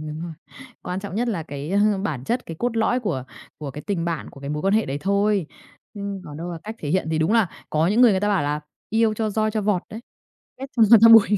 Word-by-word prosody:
Đúng 155 +1 -6
rồi, 170 -1 -5 0.5
quan 180 +1 -4
trọng 195 -1 -7
nhất 240 +2 0
là 180 -8 -2
cái, 145 +2 -6
à, 205 0 +3
bản 135 -9 -3
chất, 245 - -2
cái 165 - -7
cốt 240 -1 -1
lõi 235 +3 +2
của 155 - -2 0.3
của 145 -3 -5
cái 150 +3 -8
tình 185 -5 -1
bạn, 170 -2 -3
của 140 - -14
cái 140 - -5
mối 150 +2 -3
quan 195 +2 +2
hệ 220 - +2
đấy 140 +2 -3
thôi, 200 -1 +1 0.5
ưm, 200 -2 -5
còn 145 - -9
đâu 175 +2 -5
là 165 - -6
cách 220 +1 -5
thể 150 - -5
hiện 185 -2 +1
thì 160 - 0
đúng 160 +7 +2
là 225 -6 +4 0.2
có 155 +2 +2
những 210 +6 +2
người, 245 -3 +8
người 190 -1 +1
ta 205 - +1
bảo 200 -6 +2
là 150 +1 -1 0.3
"Yêu 220 -1 +2
cho 215 -1 -1
roi 215 +1 0
cho 215 0 -1
vọt 195 -3 +1
đấy, 220 - -7 0.6
ghét 270 - -5
cho 230 - +5
ngọt 230 - +10
cho 230 - +10
bùi." 225 -2 +8
195 Hz, 280 wpm, -23 LUFS, 160-215 Hz, 0.6 s, ngọt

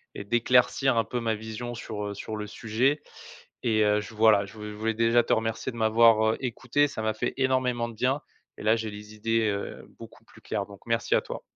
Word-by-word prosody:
et 100 - -6
d'éclaircir 125 +3 +3
un 115 - +2
peu 120 -1 -3
ma 115 -1 0
vision 110 +3 -6
sur, 105 -2 -5
heu, 100 - -4
sur 110 +2 -6
le 105 0 -4
sujet, 120 +9 0 0.6
et 110 -2 +3
heu, 105 0 +3
j 105 +2 -10
voilà, 110 -2 +5
je 100 - -13
je 105 0 -6
voulais 110 +1 -1
déjà 115 +1 +4
te - - -4
remercier 115 +3 -1
de 120 - -10
m'avoir, 110 0 +5
heu, - - -5
écouté. 130 +3 +1
Ça 110 - -5
m'a 110 0 +1
fait 110 - -2
énormément 130 -3 +1
de 115 - -11
bien, 130 +5 0 0.4
et - - -9
là 110 +1 +4
j'ai 110 -1 -4
les 105 +1 -10
idées, 115 +1 +1
heu, 100 0 -5
beaucoup - - -13
plus - - -19
claires 100 - -3
donc 100 -1 -14
merci 115 0 +1
à - - +3
toi. - - -7
110 Hz, 230 wpm, -27 LUFS, 105-120 Hz, 0.6 s, voilà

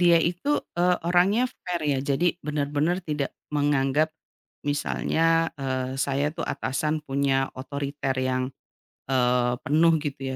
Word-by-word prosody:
dia 175 -1 +6
itu, 180 - 0 0.2
eee, 180 +1 +3
orangnya 195 +8 +3 0.2
fair 175 -2 -2
ya, 140 -2 +2
jadi 165 +6 +1
benar-benar 150 +4 0
tidak 150 -3 -2 0.2
menganggap 145 +1 +2 0.5
misalnya, 165 +3 +1
eee, 130 -1 -2
saya 140 +2 0
itu 165 0 -5
atasan, 155 +3 -1
punya 135 -1 +1
otoriter 140 0 -3
yang, 130 0 0 0.6
eee, 125 -1 +3
penuh, 165 +3 +4
gitu, 145 -3 -4
145 Hz, 120 wpm, -26 LUFS, 135-165 Hz, 0.6 s, dia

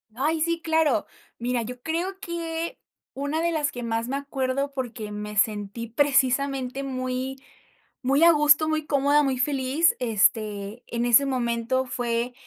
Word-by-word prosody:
Ay, 310 +5 0
sí, 335 0 0
claro. 320 -8 +2 0.3
Mira, 240 0 -1
yo 245 +2 -7
creo 350 +6 -3
que 335 -3 -4 0.4
una 285 +4 -2
de 340 0 +1
las 300 -3 0
que 245 - -6
más 230 0 -2
me 270 +2 -1
acuerdo, 275 0 -2
porque 235 -5 -5
me 210 0 -6
sentí, 210 +2 0
precisamente, 270 +1 +1
muy 255 0 -3 0.7
muy 275 +5 +3
a 340 - +9
gusto, 300 0 +4
muy 310 -1 -1
cómoda, 285 +1 +3
muy 270 -2 0
feliz, 275 +4 +2
este, 215 -1 0
en 235 0 -2
ese 245 +3 +6
momento 250 0 0
fue 240 0 -2
260 Hz, 150 wpm, -25 LUFS, 235-295 Hz, 0.7 s, a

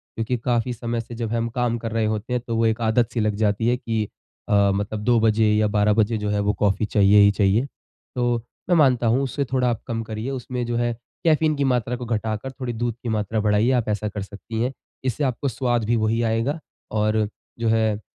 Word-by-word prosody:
क्योंकि 115 +2 -1
काफ़ी 120 +1 0
समय 115 0 -3
से 120 +1 -10
जब 115 -1 -3
हम 115 0 0
काम 120 -1 +1
कर 115 0 -4
रहे 110 -1 +1
होते 110 +3 -2
हैं 125 - 0
तो 115 - -1
वो 115 0 +2
एक 110 +1 +1
आदत 115 +1 +2
सी 120 - -1
लग 105 -1 +1
जाती 105 +1 +1
है 120 +1 +2
कि 115 -3 -1 0.5
अ, 100 -1 +4
मतलब 105 +1 -2
2 120 +1 +4
बजे 110 0 +3
या 105 0 +3
12 105 0 +2
बजे 110 +1 +2
जो 105 -1 -2
है 105 0 0
वो 100 0 +1
कॉफी 100 +1 +2
चाहिए 105 -1 +5
ही 100 0 +6
चाहिए। 100 +4 +2 0.5
तो 120 -1 +1 0.3
मैं 175 - +5
मानता 125 -6 +4
हूँ 120 +4 +3
उससे 140 +1 -2
थोड़ा 125 -1 +1
आप 115 -2 -2
कम 115 -2 -2
करिए, 110 +3 -5
उसमें 125 -1 -4
जो 120 0 -2
है 120 0 0 0.3
कैफीन 155 -1 +3
की 140 - 0
मात्रा 125 -2 0
को 125 0 -6
घटाकर 110 +2 -2
थोड़ी 125 -2 -5
दूध 120 0 -2
की 120 - -3
मात्रा 110 0 -1
बढ़ाइए, 105 +3 +3
आप 120 -4 +1
ऐसा 105 0 -1
कर 105 0 -5
सकती 105 +3 -6
हैं। 125 +2 0 0.3
इससे 130 +3 -1
आपको 135 +1 -1
स्वाद 120 -2 0
भी 120 +2 +2
वही 110 +1 +1
आएगा 115 +7 0 0.3
और 110 0 +1 0.3
जो 115 - 0
है, 110 -2 +2
115 Hz, 230 wpm, -23 LUFS, 105-120 Hz, 0.5 s, ही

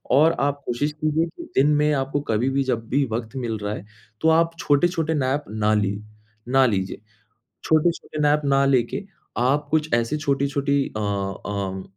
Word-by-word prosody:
और 155 +5 +5
आप 145 0 0
कोशिश 145 +5 -1
कीजिए 155 +2 0
कि 345 - -8
दिन 140 +3 +5
में 150 0 +3
आपको 135 +1 -1
कभी-भी 130 +5 +1
जब 115 -3 -2
भी 140 - +2
वक़्त 115 +2 -4
मिल 115 -4 -3
रहा 105 0 -2
है, - - -8 0.4
तो 160 - +2
आप 165 +1 +4
छोटे-छोटे 160 +2 +1
नैप 140 0 0
ना 110 0 0
ली 100 -1 0 0.5
ना 135 +1 +4
लीजिए। 95 -5 -2 0.6
छोटे-छोटे 160 0 +1
नैप 150 +1 +3
ना 140 0 +3
लेके 130 - +1 0.4
आप 135 +5 +1
कुछ 155 0 0
ऐसी 120 +5 +1
छोटी-छोटी 140 0 0
अ - - -2
अ, 100 -1 -3
140 Hz, 165 wpm, -23 LUFS, 115-150 Hz, 0.6 s, और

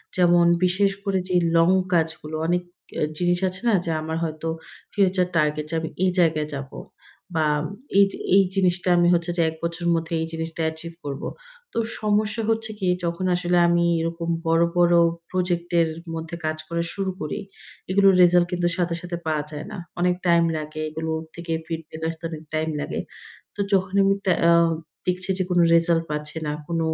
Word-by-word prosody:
যেমন 175 -1 +5 0.2
বিশেষ 195 +2 +3
করে 195 -2 0
যে 180 - 0 0.2
long 165 +3 +5 0.2
কাজগুলো। 160 -2 -1
অনেক 175 +1 +1 0.4
আ - - -1 0.2
জিনিস 175 0 +2
আছে 185 0 -2
না - - +3
যা 165 - -1
আমার 160 +1 -3
হয়তো 155 0 -4 0.5
future 190 -2 +2
target 150 -1 +1
যে 165 - -3
আমি 160 0 -4
এই 185 - +3
জায়গায় 155 -3 +2
যাব। 135 -1 -6 0.7
বা 155 -1 +2 0.5
এই 200 - +8
যে - - -7 0.2
এই 195 - +7
জিনিসটা 180 -1 +1
আমি 175 0 +4
হচ্ছে 170 0 +1
যে - - +3
১ 160 - -8
বছরের 170 +1 -1
মধ্যে 165 0 -3
এই 160 - -2
জিনিসটা 165 0 -4
achieve 165 +1 -8
করব। 140 -1 -5 0.5
তো - - -5 0.2
সমস্যা 215 +1 +1
হচ্ছে 225 -1 0
কি? 185 - -1 0.2
যখন 170 +2 -2
আসলে 175 0 +1
আমি 170 0 +3
এরকম 165 +1 -3 0.2
বড়, 165 +1 +4
বড় 175 0 +5 0.3
project 175 -2 -1
এর 165 - +4 0.3
মধ্যে 165 +1 -5
কাজ 155 0 -1
করা 170 0 -1
শুরু 195 -1 -2
করি, 155 +6 -3 0.5
এগুলোর 195 0 +5
result 175 0 +6
কিন্তু 175 -1 +1
সাথে 170 -1 0
সাথে 175 -1 -5
পাওয়া 155 -2 0
যায় 150 0 -6
না। 210 - -6 0.2
অনেক 180 0 +2
time 170 -1 +4
লাগে। 155 0 -5
এগুলো 160 +1 -4 0.2
থেকে 170 0 -6 0.2
feedback 160 -1 -6
আসতে 165 +1 -8
অনেক 160 -1 -7
time 155 0 0
লাগে। - - -3 0.6
তো - - -17
যখন 190 0 +2
আমি 195 0 +4
টা 190 - +3 0.2
আ - - +6 0.6
দেখছি 185 +1 -1
যে 185 - +2
কোন 175 -1 +2
result 165 0 +4
পাচ্ছি 150 +1 -3
না, 150 - -1 0.2
কোন 170 -1 -1
170 Hz, 185 wpm, -23 LUFS, 160-180 Hz, 0.7 s, এই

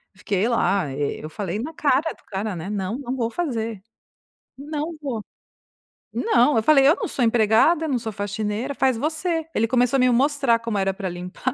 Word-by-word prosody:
fiquei 195 +2 -1
lá. 200 - +1
Eu 145 +2 -3
falei 195 +3 -4
na 310 +7 -5
cara 295 +1 +1
do - - -26
cara, 200 0 -3
né: 170 +3 -6
"Não, 205 +2 -2
não 265 -2 -4
vou 230 -3 -1
fazer, 230 - -3 0.8
não 300 +3 -4
vou." 240 -7 -4 0.9
Não, 295 - +3
eu 220 - +2
falei: 275 +1 +5
"Eu 315 - +6
não - - -3
sou 250 - -1
empregada, 230 +9 +3
não 265 - +1
sou 225 -2 -4
faxineira, 210 +5 -3
faz 260 -3 +2
você." 320 +4 -1
Ele 225 - +3
começou 250 +2 +2
a - - +1
me 255 0 +4
mostrar 265 -1 +2
como 230 -2 -3
era 195 -1 +1
pra 195 -1 -5
limpar 180 +9 -4
235 Hz, 185 wpm, -23 LUFS, 205-280 Hz, 0.9 s, Eu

